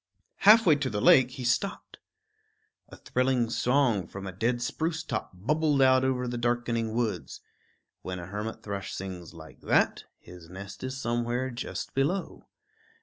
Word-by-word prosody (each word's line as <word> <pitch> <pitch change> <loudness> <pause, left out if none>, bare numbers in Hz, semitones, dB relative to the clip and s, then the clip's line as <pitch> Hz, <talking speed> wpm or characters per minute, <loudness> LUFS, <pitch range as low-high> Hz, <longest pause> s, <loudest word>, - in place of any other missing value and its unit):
Halfway 205 -7 +6
to 140 -2 -2
the 105 -3 -2
lake, 125 +4 +6
he 125 0 -8
stopped; 140 +12 -2 0.9
a - - -12
thrilling 125 -2 0
song 125 -7 +2
from 100 0 -8
a 95 - -5
dead 115 +7 -1
spruce 160 +7 -2
top - - -4
bubbled 145 - 0
out 130 -1 +5
over 130 -1 0
the 120 0 -3
darkening 120 -2 -1
woods. 100 - -2 0.6
When 90 0 -5
a 85 - -7
hermit 105 +4 -5
thrush 100 -2 -5
sings 90 -3 -7
like 80 -1 -13
that, - - +1
his 85 -2 -14
nest 100 +5 -9
is 130 +1 -4
somewhere 120 +2 -1
just 120 - -5
below. 155 +8 -2
120 Hz, 150 wpm, -28 LUFS, 100-130 Hz, 0.9 s, Halfway